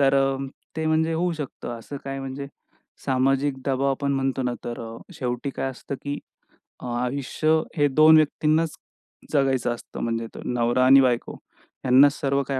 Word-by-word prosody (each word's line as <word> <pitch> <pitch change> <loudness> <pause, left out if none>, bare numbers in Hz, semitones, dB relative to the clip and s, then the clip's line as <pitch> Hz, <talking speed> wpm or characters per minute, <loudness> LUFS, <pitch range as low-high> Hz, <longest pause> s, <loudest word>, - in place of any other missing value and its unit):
तर 135 -1 +4
अ, 135 0 +2 0.4
ते 160 0 -1
म्हणजे 160 +1 +2
होऊ 175 +2 0
शकतं. 150 -6 -6
असं 130 +5 -8
काय 135 0 -4
म्हणजे 135 +1 -5 0.6
सामाजिक 135 +1 +2
दबाव 135 0 +1
आपण 140 +1 -1
म्हणतो 135 -1 0
ना, 125 -1 -1
तर 120 0 -5
अ, 115 0 -7 0.2
शेवटी 125 -2 -3
काय 135 0 -3
असतं 130 +2 -7
की 145 0 -3 0.6
अ, - - -7
आयुष्य 135 +4 -1 0.3
हे 145 -1 +4
दोन 155 +3 +6
व्यक्तींनाच 155 +1 +2 0.6
जगायचं 135 -4 +2
असतं. - - -10
म्हणजे 115 0 -2
तर - - -7
नवरा 120 +1 +2
आणि 135 +1 +8
बायको. 125 -2 +1 0.5
ह्यांनाच 135 +2 +6
सर्व 140 0 +1
काही 135 -1 -1
135 Hz, 165 wpm, -24 LUFS, 130-145 Hz, 0.6 s, आणि